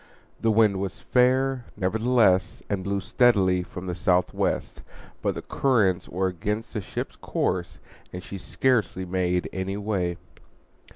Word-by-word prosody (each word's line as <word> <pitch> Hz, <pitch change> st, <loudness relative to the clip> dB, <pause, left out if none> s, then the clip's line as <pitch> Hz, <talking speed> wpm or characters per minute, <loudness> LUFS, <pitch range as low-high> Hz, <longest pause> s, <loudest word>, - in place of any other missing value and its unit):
The 115 Hz, -, +1 dB
wind 105 Hz, -3 st, +4 dB
was 95 Hz, -1 st, -4 dB
fair, 130 Hz, 0 st, +2 dB
nevertheless, 105 Hz, -1 st, +2 dB
and 95 Hz, -2 st, -1 dB
blew 100 Hz, +1 st, -1 dB
steadily 95 Hz, -5 st, +3 dB
from 90 Hz, +1 st, -8 dB
the 90 Hz, -, -3 dB
southwest; 90 Hz, 0 st, 0 dB, 0.4 s
but -, -, 0 dB
the -, -, -6 dB
currents 105 Hz, -10 st, +1 dB
were 95 Hz, +2 st, -1 dB
against 105 Hz, +5 st, -3 dB
the 105 Hz, -, -2 dB
ship's -, -, -5 dB
course, 85 Hz, -4 st, -2 dB, 0.3 s
and 90 Hz, 0 st, -7 dB
she 100 Hz, -, -7 dB
scarcely 110 Hz, -6 st, 0 dB
made 90 Hz, -1 st, 0 dB
any 95 Hz, +1 st, -3 dB
way. 95 Hz, -5 st, -1 dB
95 Hz, 135 wpm, -25 LUFS, 90-110 Hz, 0.4 s, wind